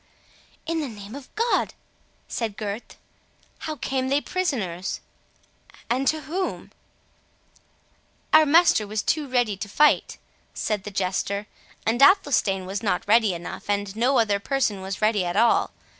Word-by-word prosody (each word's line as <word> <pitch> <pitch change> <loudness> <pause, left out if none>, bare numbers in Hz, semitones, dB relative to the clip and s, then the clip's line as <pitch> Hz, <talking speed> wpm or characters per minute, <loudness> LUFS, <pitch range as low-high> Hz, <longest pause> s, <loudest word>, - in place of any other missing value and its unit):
"In 325 0 -1
the 295 - -3
name 205 -1 -10
of 280 -1 -9
God!" 460 +2 0 0.5
said 220 -4 -3
Gurth, 210 +1 -6 0.6
"how 310 - -4
came 260 -1 -2
they 280 +2 +2
prisoners?—and 250 - -5
to 310 0 +1
whom?" 360 +5 -4 1.6
"Our 310 0 +7
master 315 -9 +5
was 210 -1 -2
too 300 -2 0
ready 245 -5 +1
to 205 +1 -6
fight," 300 +8 +3 0.4
said 210 -3 -2
the - - -4
Jester; 195 +1 -2 0.4
"and 230 +4 +1
Athelstane 270 - +4
was 195 +3 -4
not 200 -4 -1
ready 215 -3 +4
enough, 170 +4 -8
and 205 -1 -1
no 250 +4 +2
other 205 -3 +2
person 215 -4 -1
was 195 +2 -5
ready 215 -3 +3
at 175 +2 -2
all. 230 +2 +4
225 Hz, 140 wpm, -24 LUFS, 200-280 Hz, 1.6 s, Our